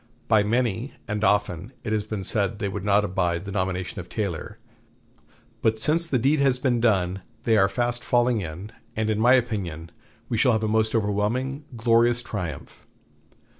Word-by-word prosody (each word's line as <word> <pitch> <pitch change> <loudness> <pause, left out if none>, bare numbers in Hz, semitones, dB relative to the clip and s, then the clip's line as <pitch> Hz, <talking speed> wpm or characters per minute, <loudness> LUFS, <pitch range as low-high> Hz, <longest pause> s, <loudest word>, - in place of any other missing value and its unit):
By 110 -2 +5
many, 115 +3 0
and 105 -1 -2
often, 105 +1 +1
it 110 - -2
had 105 0 -2
been 105 -3 -3
said 105 +2 0
they 100 - -2
would 100 0 -4
not 105 +1 +3
abide 90 -2 -1
the 100 - -5
nomination 95 +1 -2
of 90 - -8
Taylor; 100 -7 -4 1.0
but 110 0 +2
since 165 +8 +1
the 140 - +1
deed 140 +5 +2
has 135 -2 +3
been 125 -2 +1
done, 95 -5 +1 0.2
they 115 - +3
are 95 -2 +4
fast 120 +2 -1
falling 120 -2 +2
in, 90 +5 -7 0.2
and 110 0 0
in 105 - -1
my 120 +3 +5
opinion 90 -10 -2 0.4
we 115 - -1
shall 125 0 +4
have 110 0 0
a - - +1
most 110 +1 +1
overwhelming, 115 +7 -1
glorious 120 +1 +3
triumph. 90 - -6
110 Hz, 175 wpm, -25 LUFS, 100-120 Hz, 1.0 s, By